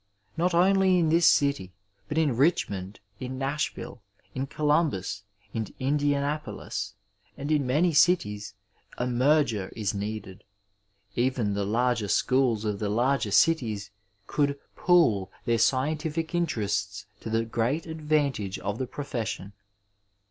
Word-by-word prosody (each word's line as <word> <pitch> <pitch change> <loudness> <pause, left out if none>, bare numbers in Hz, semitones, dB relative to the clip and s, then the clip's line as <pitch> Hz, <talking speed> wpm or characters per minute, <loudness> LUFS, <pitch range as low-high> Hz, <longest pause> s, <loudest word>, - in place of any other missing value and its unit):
Not 170 +2 +1
only 190 +1 +4
in 165 -3 +2
this 165 +1 +5
city, 140 - +2 0.4
but 150 - -3
in 150 -6 +2
Bichmond, 105 - +1 0.2
in 130 +1 -5
Nashville, 140 +3 -3 0.3
in 130 +1 -3
Columbus, 150 - 0 0.3
in 110 -2 -2
Indianapolis, 145 -6 -1 0.4
and 145 +2 -4
in 145 -4 +2
many 160 +7 +2
cities 105 - +2 0.4
a 125 - -1
merger 125 -5 +2
" - - -24
is 105 -2 -1
needed. 100 -2 -5 0.7
Even 120 -4 +1
the 100 0 -1
larger 115 0 +1
schools 125 -1 +2
of 105 -2 -2
the 105 - -1
larger 120 +2 +1
cities 110 -7 +2 0.3
could 140 +3 0
" - - -42
pool 140 - +3
" - - -33
their 115 -1 +2
scientific 155 +6 0
interests 105 - -1
to - - -7
the 115 +1 +1
great 120 +8 -1
advantage 150 - -1
of 100 +2 -4
the 130 - -2
profession. 120 -7 -5
130 Hz, 135 wpm, -27 LUFS, 105-150 Hz, 0.7 s, this